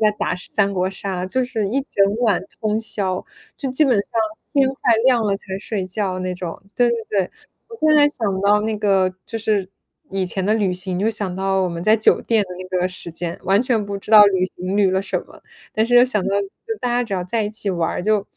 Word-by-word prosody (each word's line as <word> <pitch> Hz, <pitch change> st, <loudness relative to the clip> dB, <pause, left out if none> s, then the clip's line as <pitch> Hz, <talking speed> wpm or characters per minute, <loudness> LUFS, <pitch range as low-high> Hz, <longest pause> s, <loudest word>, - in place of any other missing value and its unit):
在 215 Hz, -1 st, +4 dB
打 -, -, 0 dB
三 200 Hz, +2 st, 0 dB
国 185 Hz, -1 st, 0 dB
杀， 190 Hz, -1 st, -4 dB
就 255 Hz, +7 st, 0 dB
是 220 Hz, -5 st, -2 dB
一 270 Hz, +6 st, 0 dB
整 200 Hz, +1 st, +2 dB
晚 215 Hz, -6 st, +3 dB, 0.2 s
通 215 Hz, 0 st, 0 dB
宵， 195 Hz, -4 st, -1 dB, 0.3 s
就 270 Hz, -, -4 dB
基 260 Hz, +4 st, +3 dB
本 265 Hz, -4 st, +3 dB
上 200 Hz, -1 st, -2 dB, 0.4 s
天 275 Hz, -2 st, +4 dB
快 265 Hz, -3 st, +2 dB
亮 250 Hz, -3 st, +4 dB
了 200 Hz, -2 st, 0 dB
才 195 Hz, -1 st, -7 dB
睡 205 Hz, -2 st, -3 dB
觉 185 Hz, 0 st, -2 dB
那 185 Hz, 0 st, -2 dB
种。 180 Hz, 0 st, -6 dB
对 245 Hz, -1 st, +3 dB
对 235 Hz, -, +1 dB
对， 195 Hz, -3 st, 0 dB, 0.4 s
我 460 Hz, -, -10 dB
现 310 Hz, -, +5 dB
在 290 Hz, -1 st, +6 dB
想 240 Hz, -6 st, -2 dB
到 205 Hz, +1 st, +3 dB
那 220 Hz, 0 st, -1 dB
个 195 Hz, -3 st, +2 dB
就 225 Hz, -, -5 dB
是 210 Hz, -4 st, 0 dB, 0.4 s
以 195 Hz, -1 st, 0 dB
前 185 Hz, +1 st, -2 dB
的 210 Hz, +3 st, +2 dB
旅 205 Hz, -4 st, +1 dB
行， 180 Hz, 0 st, -3 dB
就 210 Hz, +4 st, +1 dB
想 200 Hz, -4 st, -3 dB
到 190 Hz, 0 st, 0 dB
我 185 Hz, -, 0 dB
们 170 Hz, -1 st, -5 dB
在 215 Hz, +1 st, +5 dB
酒 220 Hz, -1 st, +4 dB
店 225 Hz, -3 st, +2 dB
的 -, -, -17 dB
那 185 Hz, 0 st, -3 dB
个 180 Hz, -, +1 dB
时 180 Hz, -2 st, -5 dB
间， 170 Hz, 0 st, -5 dB
完 195 Hz, +4 st, +4 dB
全 240 Hz, -5 st, 0 dB
不 200 Hz, 0 st, -5 dB
知 195 Hz, -, -11 dB
道 215 Hz, -1 st, +10 dB
旅 190 Hz, -2 st, +2 dB
行 185 Hz, +1 st, -5 dB
旅 200 Hz, -2 st, +3 dB
了 190 Hz, +1 st, 0 dB
什 -, -, -2 dB
么， -, -, -17 dB, 0.3 s
但 220 Hz, -, +2 dB
是 245 Hz, +2 st, 0 dB
又 245 Hz, -, +8 dB
想 215 Hz, -6 st, 0 dB
到 200 Hz, +1 st, +1 dB, 0.3 s
就 450 Hz, -, -2 dB
大 250 Hz, -, -1 dB
家 245 Hz, +1 st, +1 dB
只 220 Hz, -, -8 dB
要 180 Hz, -, -1 dB
在 220 Hz, +5 st, -1 dB
一 205 Hz, -, -3 dB
起 215 Hz, -1 st, -3 dB
玩 170 Hz, -3 st, 0 dB
儿， -, -, -3 dB
就 210 Hz, 0 st, +1 dB
200 Hz, 270 characters per minute, -20 LUFS, 185-225 Hz, 0.4 s, 道